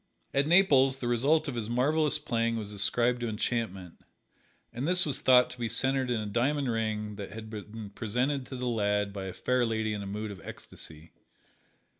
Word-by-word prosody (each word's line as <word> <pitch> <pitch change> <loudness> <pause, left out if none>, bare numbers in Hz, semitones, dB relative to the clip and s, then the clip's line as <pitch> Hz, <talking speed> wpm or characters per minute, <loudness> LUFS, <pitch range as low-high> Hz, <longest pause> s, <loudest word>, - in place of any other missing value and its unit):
At 140 +1 +2
Naples 140 -7 +5
the 125 - -4
result 140 +7 +2
of 140 - -3
his 115 -2 -3
marvelous 150 +5 +2
playing 115 -5 -1
was 105 -2 -5
ascribed 120 +4 +1
to 120 - -1
enchantment, 105 -5 -3 0.7
and 125 +5 -3
this 180 +1 +4
was 145 -4 +1
thought 125 -1 +5
to 125 - -9
be 115 -1 -1
centered 130 +3 0
in 120 -2 0
a 105 - -3
diamond 130 +5 0
ring 105 -2 -2
that 100 -2 -6
had 110 +1 -9
been 105 0 -8
presented 125 +6 -1
to 130 - -7
the 125 0 -4
lad 105 -3 0
by 100 -1 -5
a 95 - -4
fair 125 -1 +1
lady 110 -2 0
in 105 - -4
a 100 - -6
mood 105 +2 -4
of 95 -4 -10
ecstasy. 80 +1 -9
115 Hz, 195 wpm, -29 LUFS, 105-130 Hz, 0.7 s, Naples